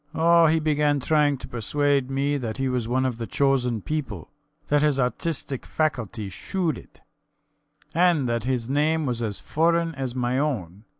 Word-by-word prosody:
Oh, 170 0 +5
he 160 +1 +3
began 150 -2 +1
trying 145 +1 +2
to - - -9
persuade 140 +3 0
me 140 +2 0
that 115 -4 -4
he 135 0 0
was 125 -3 -1
one 130 +2 +1
of 125 -3 -2
the 115 - -4
chosen 125 -6 +1
people 130 - -4 0.4
that 145 0 +3
his 150 -2 +2
artistic 135 +1 -1
faculty 120 -9 -2
shewed 170 - -2
it, - - -19 0.9
and 170 -5 +3
that 115 -1 -1
his 125 -3 -1
name 150 +3 +1
was 120 -3 -2
as 105 -3 -2
foreign 165 +1 +1
as 130 -3 -4
my 125 +1 0
own. 105 - -3
135 Hz, 170 wpm, -25 LUFS, 120-150 Hz, 0.9 s, Oh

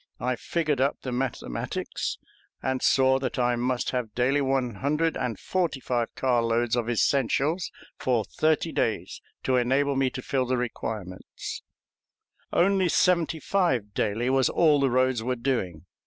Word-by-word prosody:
I - - 0
figured 155 -6 -1
up 140 +2 +1
the 130 - -3
mathematics, 125 - -3 0.5
and 130 -1 -1
saw 130 0 +4
that 130 +1 -3
I 120 -1 +2
must 125 +1 -1
have 125 -4 -3
daily 130 +4 +2
one 130 -5 0
hundred 150 +3 0
and 115 -5 -3
forty 175 -7 -1
five 120 -3 -2
car 125 -3 +2
loads 115 +1 +1
of 120 -1 -1
essentials 140 - +1 0.3
for 120 -4 +1
thirty 155 +8 +1
days - - -2 0.2
to 130 -1 +2
enable 135 +3 +2
me 135 -1 +2
to 130 - -7
fill 130 -2 0
the 130 0 +1
requirement. 110 -6 -4 1.3
Only 190 0 +3
seventy 170 -2 +2
five 130 - 0
daily 115 +6 0
was 135 -1 +3
all 155 -4 +4
the 135 -1 +3
roads 130 -1 +2
were 125 +2 -1
doing. 115 - -2
130 Hz, 155 wpm, -26 LUFS, 120-140 Hz, 1.3 s, saw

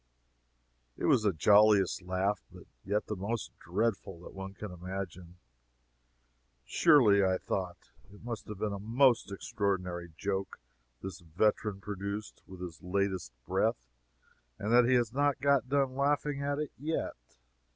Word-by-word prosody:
It - - -2
was - - +5
the 105 -2 +2
jolliest 100 +3 +5
laugh, 95 +3 -1
but - - -12 0.2
yet 105 +2 -1
the 105 - -3
most 105 +2 -3
dreadful, 95 -1 -2
that - - -11
one 95 0 -7
can 105 -1 -7
imagine. 90 -1 -7 1.3
Surely, 110 - +5
I 95 -1 +2
thought, 90 -2 -4 0.2
it 105 - -15
must 120 -2 -5
have 105 - -6
been 105 +1 -2
a 100 - -4
most 115 +1 +3
extraordinary 90 -4 -2
joke 95 -1 -3 0.4
this 95 -2 -6
veteran 100 +4 0
produced 100 +1 -5
with 95 -1 -11
his 85 -3 -7
latest 95 -5 -1
breath, 60 - 0 0.7
that 120 +4 +4
he 130 +1 +4
has 120 -2 +1
not 145 0 +2
got 140 -2 +2
done 135 -2 +1
laughing 140 +1 +1
at 140 0 -1
it 150 -1 -3
yet. 155 - -2
100 Hz, 140 wpm, -31 LUFS, 95-120 Hz, 1.3 s, was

